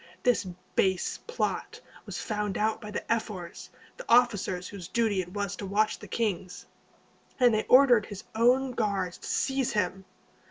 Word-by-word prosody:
This 245 -5 +2 0.3
base 190 -2 +1
plot 475 - -2 0.3
was - - -5
found 210 -2 -2
out 215 +1 0
by 210 - -7
the 210 - -4
ephors, 205 -6 -5 0.3
the - - -9
officers 205 -7 +3
whose 190 -4 -8
duty 220 -4 +1
it 180 0 -9
was 200 -1 -3
to 200 - -5
watch 215 +2 +1
the - - -10
kings, 190 -5 -3 0.7
and 245 -2 +5
they 215 - +1
ordered 250 -5 +6
his 205 -1 -8
own 250 +4 +3
guards 200 -6 -1
to - - -9
seize 265 -2 0
him. 190 -2 -1
210 Hz, 160 wpm, -28 LUFS, 190-235 Hz, 0.7 s, ordered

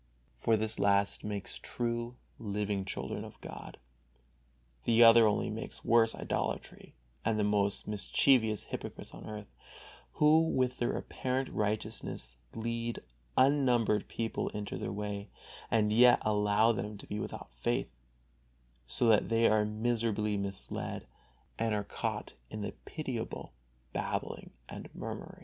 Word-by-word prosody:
For 115 - +3
this 110 0 -1
last 100 0 +3
makes 105 -2 -4
true, 120 0 -2 0.2
living 105 -2 -2
children - - -4
of - - -11
God, - - -9 1.1
the 115 0 +6
other 115 -1 +9
only 105 - +1
makes - - -7
worse 115 -1 +5
idolatry - - -3 0.3
and 110 -1 +1
the - - +3
most 100 -1 +1
mischievous 110 +2 +3
hypocrites - - -7
on - - -9
earth, 105 -1 -8 0.6
who 150 +1 +6
with 130 -6 +1
their 120 - 0
apparent 130 +1 -2
righteousness 105 - -2 0.2
lead 115 +1 -3 0.3
unnumbered 125 -6 +4
people 115 -1 -2
into 105 -1 -5
their - - -3
way, 100 0 -4 0.4
and 105 -2 +3
yet 120 +2 +7
allow 105 +1 +3
them 105 -1 -3
to - - -10
be 105 - -4
without 60 - -6
faith, - - -1 1.0
so 65 - +1
that 110 -3 +4
they 115 0 +4
are 105 -1 +4
miserably 110 -1 0
misled, 100 -1 -4 0.5
and 115 -1 +1
are 105 - -1
caught 100 - -4 0.2
in 110 - -5
the 105 - -3
pitiable 130 -8 -5 0.4
babbling - - -3 0.2
and - - -8
mummery. - - -6
110 Hz, 130 wpm, -32 LUFS, 105-115 Hz, 1.1 s, other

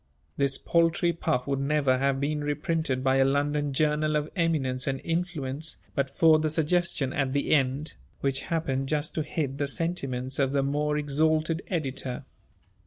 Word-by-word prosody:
This 140 -1 +1
paltry 170 +1 +2
puff 160 -6 -1
would 140 -1 -1
never 140 -2 +2
have 135 0 +1
been 150 +1 -1
reprinted 145 -2 -1
by 135 0 +3
a 135 - +5
London 145 +1 +1
journal 150 +2 +1
of 150 0 -1
eminence 140 -8 0
and 135 -1 -1
influence, 160 -4 -2 0.2
but 140 -1 0
for 155 +2 +5
the 155 0 0
suggestion 160 -3 0
at 135 -2 0
the 140 - +1
end, 140 +1 +1 0.3
which 135 -1 0
happened 135 -5 -1
just 150 0 -1
to 160 - -1
hit 145 -3 -3
the 145 - 0
sentiments 135 -5 -2
of 135 -1 +2
the 140 -1 +2
more 150 +2 0
exalted 155 +3 +1
editor. 135 -7 -3
145 Hz, 165 wpm, -27 LUFS, 135-160 Hz, 0.3 s, a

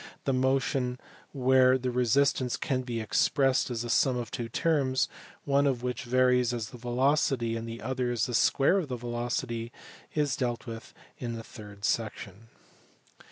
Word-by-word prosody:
The 135 - 0
motion 130 -1 0 0.3
where 130 -1 +4
the 130 -1 -2
resistance 125 +1 +2
can 130 -3 -1
be 120 -2 -4
expressed 135 +5 +2
as 120 -1 -3
the 120 - -5
sum 130 0 +3
of 120 -4 -5
two 120 -2 -4
terms, 135 -1 +1 0.4
one 140 0 +3
of 125 -3 -1
which 125 +1 -3
varies 125 0 +3
as 110 -3 -4
the 125 - -11
velocity 125 -1 +1
and 115 0 -5
the 115 0 -7
other 125 0 -1
as 120 -3 0
the 125 - -5
square 140 +10 +3
of 170 - -3
the 125 -2 -4
velocity, 120 0 -3 0.4
is 145 -3 +1
dealt 120 -2 -2
with 115 -2 -9 0.2
in 120 -2 -4
the 115 0 -6
third 105 -3 -9
section. 110 -1 -3
125 Hz, 165 wpm, -29 LUFS, 115-130 Hz, 0.4 s, where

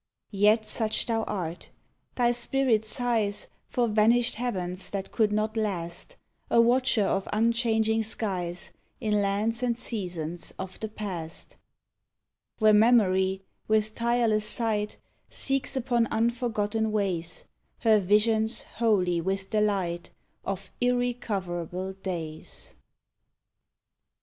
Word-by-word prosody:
Yet 210 +2 +4
such 220 0 0
thou 225 -1 0
art. 175 -4 -4 0.5
Thy 240 -1 +3
spirit 240 -2 +1
sighs 225 -4 0 0.2
For 245 -1 +1
vanished 230 +3 +3
heavens 185 -6 -3
that 195 -1 -4
could 215 -3 +2
not 215 +1 0
last 195 - -3 0.3
A - - +4
watcher 245 -1 +4
of 195 0 0
unchanging 225 0 +2
skies, 185 -5 -2 0.3
In 210 -3 +1
lands 210 +4 0
and 240 -2 0
seasons 175 -8 -5
of 190 0 -7
the 220 - -3
past, 185 -7 -6 1.0
Where 215 -1 +5
Memory, 195 -4 +4 0.2
with 215 0 +2
tireless 230 -2 +1
sight, 210 -3 0 0.3
Seeks 275 0 -1
upon 240 -2 +1
unforgotten 225 -2 0
ways 185 -5 -2 0.4
Her 220 -2 +5
visions 220 +3 +2
holy 185 -7 +2
with 190 +2 -2
the 215 -1 +2
light 185 -5 -1 0.3
Of 195 -1 -5
irrecoverable 195 -8 -1
days. 170 -5 -5
215 Hz, 110 wpm, -27 LUFS, 190-230 Hz, 1.0 s, Where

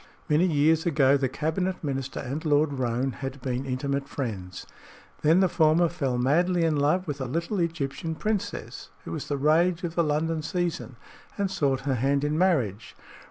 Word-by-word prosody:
Many 160 +3 +3
years 160 +1 +2
ago 140 -4 +4
the 135 -2 0
cabinet 175 +7 -2
minister 135 -2 -3
and 140 +5 -4
Lord 150 -1 +2
Roane 130 0 -1
had 135 +1 -6
been 130 +1 -3
intimate 140 +2 -2
friends; 95 -9 -5 0.6
then 160 +5 +4
the 190 - +5
former 165 0 +3
fell 140 -8 -2
madly 170 +8 +2
in 160 -2 +2
love 150 +6 +1
with 145 -2 -4
a - - -1
little 170 - -2
Egyptian 165 -1 -2
princess 210 +4 -3 0.2
who - - -6
was - - -5
the 145 - -1
rage 165 +5 +2
of 170 -2 -3
the 170 - +2
London 155 +1 0
season, 175 -6 -3 0.4
and 200 -2 -1
sought 135 -2 0
her 135 0 -1
hand 135 +3 +1
in 150 +1 0
marriage. 135 - 0
150 Hz, 175 wpm, -26 LUFS, 135-170 Hz, 0.6 s, the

